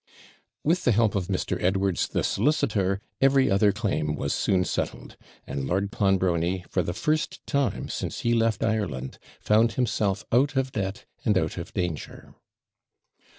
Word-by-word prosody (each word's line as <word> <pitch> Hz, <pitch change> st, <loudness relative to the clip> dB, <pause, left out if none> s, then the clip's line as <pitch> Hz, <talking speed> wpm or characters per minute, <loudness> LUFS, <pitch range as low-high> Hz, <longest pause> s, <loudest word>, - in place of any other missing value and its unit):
With 175 Hz, +4 st, +2 dB
the 120 Hz, -, +4 dB
help 110 Hz, -1 st, +3 dB
of 95 Hz, -3 st, -1 dB
Mr. 95 Hz, -2 st, -2 dB
Edwards, 95 Hz, 0 st, +1 dB
the -, -, -1 dB
solicitor, 100 Hz, -10 st, +1 dB, 0.2 s
every 135 Hz, -3 st, +4 dB
other 100 Hz, +1 st, +4 dB
claim 80 Hz, -9 st, -1 dB
was 70 Hz, -1 st, -2 dB
soon 95 Hz, -1 st, +2 dB
settled; -, -, -4 dB, 0.3 s
and 70 Hz, -1 st, -4 dB
Lord 100 Hz, +5 st, 0 dB
Clonbrony, 95 Hz, -2 st, +1 dB
for 90 Hz, -, +2 dB
the 85 Hz, +1 st, -3 dB
first 155 Hz, -1 st, -1 dB
time 140 Hz, -3 st, 0 dB
since -, -, -4 dB
he 120 Hz, -, +2 dB
left 115 Hz, -2 st, +1 dB
Ireland, 90 Hz, -, -2 dB, 0.2 s
found 110 Hz, +2 st, +3 dB
himself 110 Hz, -5 st, 0 dB
out 135 Hz, +5 st, +3 dB
of 135 Hz, 0 st, 0 dB
debt, 100 Hz, +2 st, -3 dB, 0.2 s
and 105 Hz, -5 st, +3 dB
out 80 Hz, -3 st, -1 dB
of -, -, -7 dB
danger. 90 Hz, -4 st, -4 dB
100 Hz, 150 wpm, -26 LUFS, 90-115 Hz, 0.3 s, the